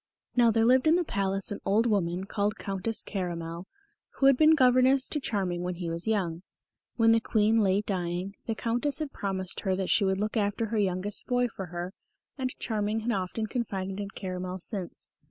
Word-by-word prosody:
Now 240 -2 +5
there 225 0 +3
lived 255 +4 +4
in 320 - +6
the 355 - +2
Palace 195 - -1
an 205 - -4
old 215 +4 +2
woman 185 -5 0
called 205 +1 -1
Countess 195 +3 -2
Caramel, 170 -2 -4 0.5
who 270 - +1
had 275 -1 +7
been 310 +4 +6
governess 255 0 +4
to 300 - 0
Charming 190 -9 -2
when 180 0 -3
he 170 -1 -4
was 170 +5 -3
young. 180 -6 0 0.5
When 225 -1 +5
the 225 - +5
Queen 220 0 +2
lay 195 -1 +3
dying, 185 -1 -3
the 225 - -1
Countess 240 +6 0
had 305 -3 -3
promised 190 -3 -2
her 190 -1 0
that 190 -1 -1
she 210 - +4
would 190 -1 +1
look 215 +3 -2
after 205 +1 0
her 220 -1 0
youngest 195 +1 -1
boy 245 -1 +2
for 190 -3 -7
her, 175 +2 -5 0.4
and 260 -2 -3
Charming 215 0 -1
had 235 +2 -1
often 195 +2 -2
confided 195 -4 -3
in 200 -1 -4
Caramel 185 -1 -5
since. 190 -1 -5
205 Hz, 195 wpm, -28 LUFS, 185-230 Hz, 0.5 s, had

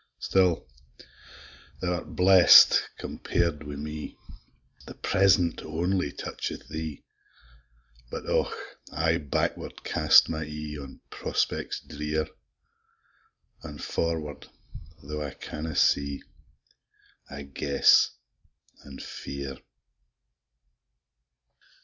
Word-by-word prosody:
Still 90 -3 +2 1.1
thou 90 -1 -1
art 90 - -6
blest, 90 -1 +7
compar'd 85 -3 -2
wi' 75 -1 -7
me! 75 +1 -6 0.7
The - - -9
present 95 -3 +2
only 85 0 -1
toucheth - - -6
thee: 80 -2 -6 1.1
But, - - -6
Och! - - +1 0.4
I 80 +1 +1
backward 75 -4 -3
cast - - +5
my 80 -1 -3
e'e, 75 0 -6
On 70 -2 -11
prospects - - -2
drear! 75 0 -3 1.4
An' - - -8
forward, 80 -3 -3 0.5
tho' 75 +2 -5
I 70 -3 -5
canna 80 0 -6
see, 70 0 +2 1.1
I 70 +1 -7
guess 70 +1 +4 0.7
an' 70 -1 -11
fear. 70 -1 -7
75 Hz, 90 wpm, -27 LUFS, 70-85 Hz, 1.4 s, blest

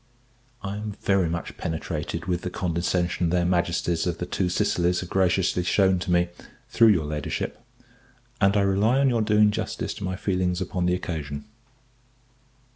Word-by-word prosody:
I 100 +1 -4
am 105 0 -5
very 95 -4 +2
much 85 0 -5
penetrated 80 0 -4
with 90 -1 -1
the 90 - -3
condescension 85 0 -1
their 90 0 +1
Majesties 85 -1 0
of 85 -2 -1
the 90 - -3
Two 90 0 -1
Sicilies 90 0 +1
have 90 - -8
graciously 95 -1 +2
shewn 95 +1 +3
to 90 +1 -3
me, 85 0 +3 0.4
through 115 - +5
your 90 -8 +4
Ladyship, 75 -1 -4 0.8
and 100 +1 +4
I - - +4
rely 100 +6 +2
on 135 -1 +4
your 120 -2 +1
doing 105 -1 +4
justice - - -3
to - - -8
my 95 0 -2
feelings 90 -1 -1
upon 90 -1 -1
the 90 - +2
occasion. 75 -5 -5
90 Hz, 165 wpm, -25 LUFS, 85-100 Hz, 0.8 s, through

